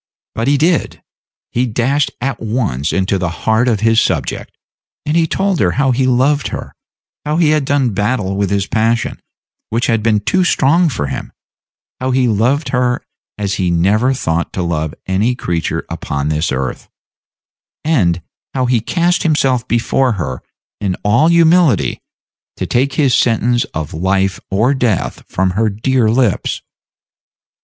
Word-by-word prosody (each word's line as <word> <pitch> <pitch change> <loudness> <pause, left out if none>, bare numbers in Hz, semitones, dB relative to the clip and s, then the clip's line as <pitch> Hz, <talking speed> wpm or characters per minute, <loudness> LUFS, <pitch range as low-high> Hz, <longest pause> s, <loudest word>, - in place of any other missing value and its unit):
But 115 +2 -2
he 140 +1 +3
did; 165 +3 0 0.5
he 125 +2 0
dashed 125 +5 +1
at 130 0 -2
once 110 - -1
into 95 0 0
the 90 -1 -1
heart 110 +8 0
of 110 -4 +1
his 115 0 +4
subject, - - -2 0.5
and 150 - 0
he 165 -1 +3
told 195 +1 0
her 90 -3 +2
how 135 -1 +2
he 130 +1 +1
loved 135 +4 +2
her; - - -6 0.5
how 150 +1 -1
he 160 -3 +3
had 155 -3 +1
done 135 -3 +1
battle 105 -1 -1
with 100 -1 0
this 100 0 0
passion, 115 +2 0 0.5
which 115 +3 0
had 115 -2 +1
been 110 -1 +2
too 185 - +1
strong 170 0 +3
for 75 - -3
him; 65 -2 -5 0.7
how 130 - -2
he 130 -1 +2
loved 120 +8 +1
her 125 -1 0 0.3
as 100 -2 -2
he 90 - +1
never 100 +9 +2
thought 85 -10 -1
to 95 - -2
love 80 -3 -2
any 105 +6 +1
creature 85 -9 -2
upon 70 +1 -3
this 75 +2 0
earth; 65 -1 -3 1.0
and 90 - +1 0.3
how 130 -1 +1
he 125 -2 +2
cast 175 - +1
himself 135 -7 +1
before 120 +2 +1
her 70 -10 -4 0.4
in 95 -3 -1
all 115 +10 +3
humility, 170 - +3 0.6
to - - -2
take 130 +3 0
his 140 -5 +2
sentence 120 0 +2
of 80 -2 -6
life 95 +3 0
or 110 +8 +2
death 120 -8 -1
from 95 0 0
her 110 +4 +1
dear 115 +3 +1
lips. 115 -3 0
115 Hz, 160 wpm, -16 LUFS, 95-135 Hz, 1.0 s, his